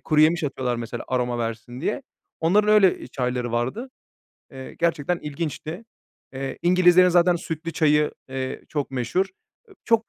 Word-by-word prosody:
kuruyemiş 155 +2 +3
atıyorlar 130 -3 -2
mesela 115 0 -5
aroma 125 -1 0
versin 115 +2 -5
diye. 215 - -2 0.4
Onların 205 +6 +3
öyle, 195 -3 +5
eee, - - -9
çayları 125 -2 -2
vardı. 130 - -2 0.6
Eee, 130 -1 -9
gerçekten 170 0 0
ilginçti. 155 +5 -5 0.5
Eee, 135 0 -5
İngilizlerin 180 0 +6
zaten 175 0 +4
sütlü 165 0 -5
çayı, 150 -1 +3 0.2
eee, 130 0 -4
çok 145 -2 -3
meşhur. 130 +9 0 0.4
Eee, 400 - -17
çok 230 -1 +2
150 Hz, 145 wpm, -24 LUFS, 130-175 Hz, 0.6 s, İngilizlerin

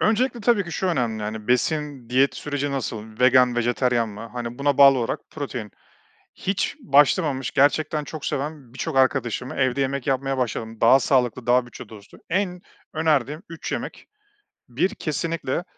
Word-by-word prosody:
Öncelikle 235 +2 +1
tabii 210 -3 +2
ki, 175 - -8
şu 190 - -2
önemli, 120 -10 -1
hani, 110 +1 -5
besin, 140 -1 -1
diyet 135 +2 +3
süreci 145 -1 -3
nasıl? 110 -4 -5
Vegan, 125 -1 +5
vejeteryan 120 -1 +1
mi? 105 0 -9
Hani, 120 +1 -6
buna 140 0 +1
bağlı 135 -2 +8
olarak 115 - -2
protein. 125 -8 -6 0.7
Hiç 195 0 -2
başlamamış 140 0 +2
gerçekten 150 +2 +2
çok 155 0 -7
seven 140 -3 -4
birçok 135 - -3
arkadaşıma 130 -1 +1
evde 130 0 +1
yemek 135 0 -2
yapmaya 135 0 0
başladım. 115 -2 -3
Daha 130 +4 +7
sağlıklı, 125 -3 +1
daha 125 0 +4
bütçe 120 - -11
dostu. 105 -2 -14
En 180 0 -1 0.3
önerdiğim 155 - 0
3 165 - -7
yemek: - - -5 0.6
1, 160 +11 +1
kesinlikle 165 -1 -2
135 Hz, 150 wpm, -23 LUFS, 120-150 Hz, 0.7 s, bağlı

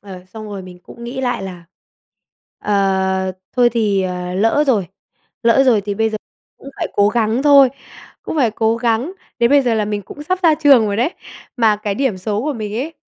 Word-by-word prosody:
ờ, 185 -3 -11
xong 215 +3 -10
rồi 200 -2 -7
mình 180 -1 -12
cũng 235 +5 -12
nghĩ 255 +3 -5
lại 245 -6 -2
là, 180 -3 -8 0.9
ờ, 190 -2 0 0.2
thôi 245 -1 +4
thì, 210 -4 +1
à, 180 -1 -4
lỡ 225 +9 +2
rồi 215 -9 +1 0.6
lỡ 235 +3 +4
rồi 240 -5 +4
thì 200 0 -4
bây 225 +2 0
giờ 215 - -3 0.4
cũng 275 - -11
phải - - -3
cố 205 0 +3
gắng 225 +2 0
thôi 280 -2 +7 0.5
cũng - - -5
phải 250 -7 +2
cố 220 +1 0
gắng, 235 +7 -1 0.3
đến 235 0 +3
bây 285 -1 +5
giờ 240 -3 +1
là 215 -1 0
mình 205 -1 -3
cũng 290 - -10
sắp 370 +5 -1
ra 325 -3 +5
trường 280 -7 +5
rồi 200 -1 -2
đấy. 245 +8 +1 0.5
Mà 220 -3 +3
cái 205 -1 -3
điểm 235 -5 -1
số 210 +3 -2
của 300 +2 -1
mình 215 -4 -5
ấy, 290 +8 -4
220 Hz, 210 wpm, -18 LUFS, 200-255 Hz, 0.9 s, thôi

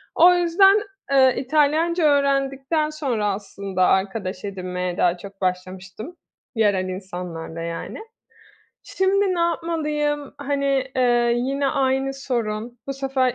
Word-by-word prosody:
O 350 +2 +7
yüzden, 385 +4 +5 0.3
eee, 260 -2 +5
İtalyanca 310 +5 +2
öğrendikten 280 +1 +1
sonra 260 -9 -2
aslında 195 -1 -3
arkadaş 190 0 -1
edinmeye 180 -2 -4
daha 175 -1 +2
çok 195 +2 -12
başlamıştım 185 - -4 0.4
yerel 205 -4 +2
insanlarla 180 -3 -6
yani. 165 0 -5 0.9
Şimdi 380 0 +1
ne 345 - -1
yapmalıyım? 300 -4 -1
Hani, 280 -1 0
eee, 240 -2 +3
yine 275 +3 -1
aynı 270 0 0
sorun, 240 -3 -3
bu 275 - 0
sefer 265 -2 0
265 Hz, 110 wpm, -22 LUFS, 195-295 Hz, 0.9 s, O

